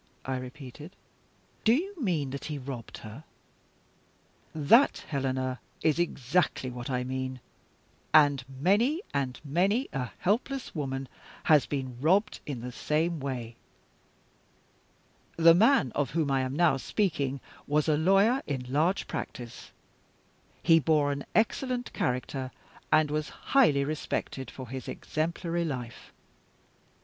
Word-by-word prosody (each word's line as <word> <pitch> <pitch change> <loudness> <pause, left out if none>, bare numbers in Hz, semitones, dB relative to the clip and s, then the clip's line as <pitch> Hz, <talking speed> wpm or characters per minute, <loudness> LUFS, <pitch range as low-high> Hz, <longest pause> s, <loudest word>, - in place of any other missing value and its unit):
I 130 0 -1
repeated. 135 +6 -9 0.7
"Do 225 +2 +5
you 385 +8 -2
mean 160 - 0
that 140 - -6
he 150 -1 -4
robbed 130 -3 -7
her?" 110 +8 -9 1.3
"That, 160 - +4
Helena, 130 -3 -1 0.2
is 155 +1 +2
exactly 140 -4 0
what 120 +1 -6
I 125 -1 0
mean 130 0 -4 0.7
and 145 -4 +5
many 205 - +2
and 130 -3 -1
many 195 - +1
a 125 -4 -2
helpless 255 +7 -1
woman 135 -3 -3 0.4
has 150 -3 +5
been 130 -3 -4
robbed 190 +8 +2
in 135 -5 -4
the 125 +1 -5
same 160 +6 0
way. 125 -4 -5 1.8
The 165 0 +8
man 205 - +4
of 140 0 -1
whom 150 -1 0
I 135 -1 +2
am 130 +1 -2
now 165 -4 +4
speaking 140 -5 -1 0.3
was 150 +2 +2
a 155 - +4
lawyer 195 - +4
in 130 -3 -3
large 165 +7 +2
practice. 120 -4 -7 0.9
He 165 -1 +6
bore 150 -2 +2
an 140 0 -4
excellent 245 +3 0
character, 130 +1 -2 0.4
and 155 -1 +4
was 150 -1 -1 0.2
highly 155 - +5
respected 145 -3 -3
for 130 -2 -9
his 130 +1 -6
exemplary 170 +2 -2
life. 125 -7 -5
145 Hz, 125 wpm, -29 LUFS, 130-170 Hz, 1.8 s, The